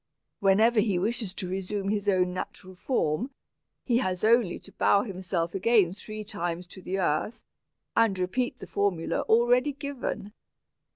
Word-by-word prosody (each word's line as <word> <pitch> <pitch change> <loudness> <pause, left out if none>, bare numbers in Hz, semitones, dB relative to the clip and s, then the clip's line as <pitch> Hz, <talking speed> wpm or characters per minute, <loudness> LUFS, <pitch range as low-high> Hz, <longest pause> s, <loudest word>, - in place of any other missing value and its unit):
Whenever 215 +4 +4
he 205 -3 +2
wishes 215 +2 -1
to 190 0 -5
resume 195 +2 -3
his 205 -1 0
own 180 -2 +2
natural 185 0 -6
form, 190 - -1 0.6
he 240 -2 +3
has 185 -7 -2
only 225 -4 +4
to - - -16
bow 200 0 +3
himself 185 -4 -3
again 195 -2 +3
three 215 +2 -7
times 175 -4 -4
to 185 +2 -12
the 185 +1 -3
earth, 185 +4 -1 0.5
and 225 -4 +3
repeat 185 +8 -1
the - - -9
formula 195 -5 0
already 245 +5 +4
given. 265 -7 -5
200 Hz, 150 wpm, -28 LUFS, 185-230 Hz, 0.6 s, Whenever